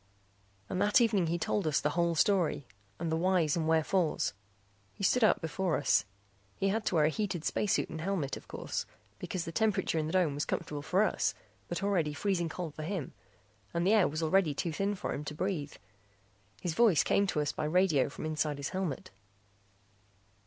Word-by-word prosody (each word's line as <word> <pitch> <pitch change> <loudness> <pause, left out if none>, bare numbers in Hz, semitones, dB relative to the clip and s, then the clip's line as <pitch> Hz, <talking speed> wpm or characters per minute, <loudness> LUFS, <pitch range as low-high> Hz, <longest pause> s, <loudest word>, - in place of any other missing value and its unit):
And 185 - -2
that 205 +3 +5
evening 215 -7 +3
he 170 +2 0
told 175 +1 -1
us 150 - +2
the 150 - 0
whole 170 0 +1
story 175 -6 +2 0.3
and 165 -1 -2
the - - +2
whys 170 -3 +2
and 160 -2 -1
wherefores. 160 +1 +1 0.6
He - - -8
stood 245 +5 +3
up 215 - +4
before 165 +2 -1
us. 145 - +2 0.5
He 195 - 0
had 215 +2 -1
to - - +1
wear 155 -2 +4
a - - +4
heated 180 -2 -3
space 210 - +1
suit - - +1
and 160 0 -6
helmet, 170 -6 -1
of - - -11
course, - - -4 0.3
because 180 -3 -4
the 165 - -5
temperature 210 -4 +1
in 155 - -1
the 160 - -4
dome 180 -6 +3
was 145 +1 -2
comfortable 145 -1 -3
for 180 +7 +2
us 215 - 0 0.3
but 175 +3 -4
already 170 -7 +1
freezing 175 -2 0
cold 165 -2 -5
for 155 - -7
him 165 -3 -4 0.6
and 170 +1 +1
the 200 - +4
air 210 -5 +5
was 155 +2 -3
already 160 -2 +2
too 170 - -2
thin 200 +5 -1
for - - -3
him 145 - -4
to 150 0 -6
breathe. 155 -5 -2 0.9
His 175 - -2
voice 205 -5 +4
came 200 - +2
to 155 - -1
us 150 - 0
by - - -3
radio 160 -4 +3
from 140 - -7
inside 155 -2 -1
his 140 -1 -3
helmet. 185 -7 -3
170 Hz, 200 wpm, -31 LUFS, 155-195 Hz, 0.9 s, that